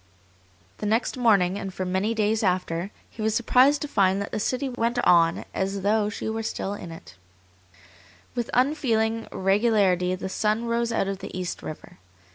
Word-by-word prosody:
The 210 - -2
next 225 +3 +1
morning, 200 -6 +3
and 195 - -5
for 185 0 -4
many 190 +5 0
days 215 0 +1
after, 180 -2 -1 0.2
he 220 - -10
was 220 0 +1
surprised 260 +5 +4
to - - -3
find 195 -7 +2
that 200 - -4
the - - -2
city 255 +5 -1
went 240 -1 -1
on 170 -1 +4
as 195 0 -2
though 210 +1 +2
she 210 - -6 0.2
still 215 -2 -3
were 205 - -4
in 170 - -8
it. 165 - -11 1.2
With 240 -2 -3
unfeeling 230 -5 +1
regularity 195 -2 +2
the 185 - -5
sun 215 +4 0
rose 235 0 0
out 225 - 0
of 195 -1 -3
the 195 -1 -7
East 180 -1 -4
River. 155 - -9
210 Hz, 175 wpm, -25 LUFS, 190-230 Hz, 1.2 s, surprised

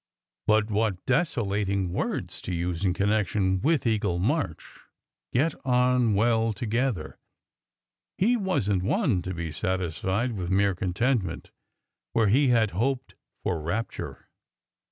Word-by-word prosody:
But 110 0 +3
what 105 -3 0
desolating 100 - 0
words - - -3
to 90 - -3
use 85 +1 -2
in 95 - +3
connection 100 -1 +1
with 155 -2 +2
Eagle 105 -6 +1
March 105 - -2 0.5
"get 145 +5 +2
on 125 -3 +3
well 115 +1 +2
together!" 110 -5 -2 1.0
He 230 +6 +3
wasn 180 - 0
t 90 - -3
one 140 - +2
to 90 +1 -5
be 85 -1 -4
satisfied 95 +6 -1
with 95 -6 -4
mere 100 +1 +3
con 90 0 -3
tentment, 110 -6 -1 0.6
where 110 -3 +3
he 135 +6 +4
had 115 -4 +3
hoped 125 +6 -1 0.3
for 80 - -1
rapture. 95 +9 -4
105 Hz, 130 wpm, -27 LUFS, 95-120 Hz, 1.0 s, he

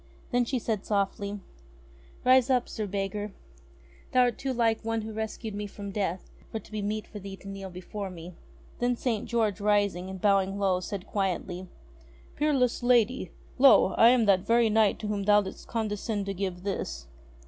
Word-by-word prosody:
Then 245 -1 +2
she 260 - -1
said 220 -4 -2
softly: 200 0 -1 0.8
"Rise 255 0 +5
up, 250 -2 +2
Sir 215 -1 -4
Beggar! 200 +1 -3 0.8
Thou 255 - +5
art 245 -2 +2
too 270 - -2
like 230 -3 +1
one 225 0 -1
who 220 0 -6
rescued 220 0 -4
me 205 0 -4
from 200 0 -7
death, 190 -3 -3 0.2
for - - -4
it - - -8
to - - -17
be 215 -1 -3
meet 210 +1 -2
for 210 - -9
thee 195 0 -7
to 195 - -14
kneel 195 -1 -6
before 190 +2 -6
me 175 0 -9 0.2
!" - - -25
Then 245 0 +1
St. 230 -3 -2
George 220 -5 0
rising, 200 -3 +1
and 190 0 -6
bowing 195 0 +2
low, 190 -2 +2
said 185 +1 -5
quietly: 185 -2 -2 0.3
*' - - -25
Peerless 275 -5 +1
lady! 245 -4 +3 0.3
Lo! 265 -7 +7
I 230 - +7
am 245 -2 +4
that 195 -2 +5
very 230 +3 +3
knight 215 -1 +3
to 215 - -3
whom 205 -1 -1
thou 210 0 +6
did'st 190 - -9
condescend 210 -2 -2
to 195 - -3
give 185 -2 -4
this." 190 - -3
205 Hz, 190 wpm, -28 LUFS, 195-230 Hz, 0.8 s, Lo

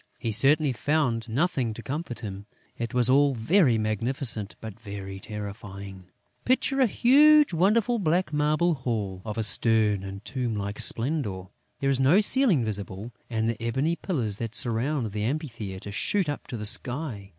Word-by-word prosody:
He 115 - -3
certainly 135 +5 +3
found 125 -4 0
nothing 125 -3 0
to 120 - -9
comfort 140 -4 -5
him. 100 -2 -7 0.3
It 115 0 -4
was 125 -1 +3
all 140 +1 +4
very 130 - +3
magnificent, 110 0 -2
but 110 -1 -9
very 100 -3 -7
terrifying. 100 -2 -8 0.4
Picture 265 +1 +1
a 255 - +5
huge 295 +3 +5
and 165 - -2
wonderful 225 +4 +3
black 175 -2 0
marble 155 +4 +2
hall, 110 -9 -3
of 110 -1 -6
a 110 - 0
stern 105 -1 +3
and 100 +1 -8
tomb 125 -4 -3
like 100 0 -4
splendour. 115 - -1 0.3
There 140 0 +2
is 135 - 0
no 140 +9 +5
ceiling 215 - +3
visible; 105 +1 -5 0.2
and 110 -1 -1
the 115 0 -3
ebony 135 +8 0
pillars 120 - -2
that 115 -1 -5
surround 120 +1 0
the 105 0 -3
amphitheatre 110 - -4
shoot 190 - 0
up 145 - -4
to 120 - -5
the 105 - -5
sky. 120 -2 -2
120 Hz, 165 wpm, -26 LUFS, 105-150 Hz, 0.4 s, a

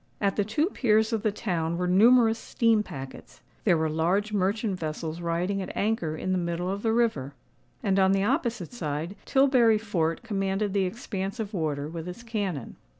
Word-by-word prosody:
At 200 -1 +1
the 205 - +2
two 220 +10 +1
piers 220 -1 +2
of 220 - 0
the 215 -1 +1
town 170 -6 -2
were 180 - -1
numerous 225 +4 +5
steam 225 -2 +2
packets;—there 150 +4 -4
were 160 0 +1
large 180 +7 0
merchant 200 0 0
vessels 160 +1 -4
riding 175 +4 -1
at 190 - -6
anchor 200 -7 0
in 185 - -2
the 185 - +1
middle 175 +1 -2
of 200 +1 -3
the 225 - +1
river;—and, 150 - -2
on 190 0 +4
the 195 0 +2
opposite 235 - -1
side, 160 -3 -4
Tilbury 255 -5 +4
Fort 170 -7 -1
commanded 195 -1 -1
the 195 -2 +2
expanse 195 +1 -4
of 215 -1 -4
water 150 -5 -2
with 165 +1 -6
its 180 +6 -8
cannon. 200 - -4
195 Hz, 175 wpm, -27 LUFS, 170-220 Hz, -, numerous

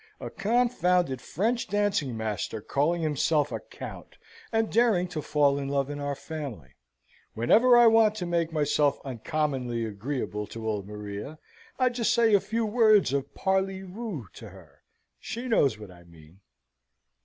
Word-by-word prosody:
A - - -7
confounded 180 - +1
French 235 - -1
dancing 205 - 0
master 110 0 -3
calling 155 +9 0
himself 150 -1 +1
a - - -3
count, - - -10 0.3
and 225 -1 0
daring 220 -6 +3
to 155 -3 -4
fall 145 -1 +2
in 140 - -4
love 140 0 -1
in 145 - -5
our 145 0 -2
family! 135 - -7 0.6
Whenever 230 - +5
I 240 - +7
want 225 -1 +5
to 185 -4 -4
make 170 -1 0
myself 150 -2 +1
uncommonly 130 -3 -2
agreeable 105 -1 -4
to 115 -1 -7
old 105 -3 -2
Maria, 105 +7 -7 0.4
I 255 -1 +3
just 240 -2 0
say 230 -2 +4
a 200 - +7
few 225 +3 -2
words 215 - +4
of 140 0 -3
parly 190 0 0
voo 190 - -6
to - - -11
her. - - -17 0.4
She 235 +3 -6
knows 140 - +2
what 105 -3 -11
I 85 -1 -16
mean." 85 +1 -18
155 Hz, 155 wpm, -27 LUFS, -, 0.6 s, I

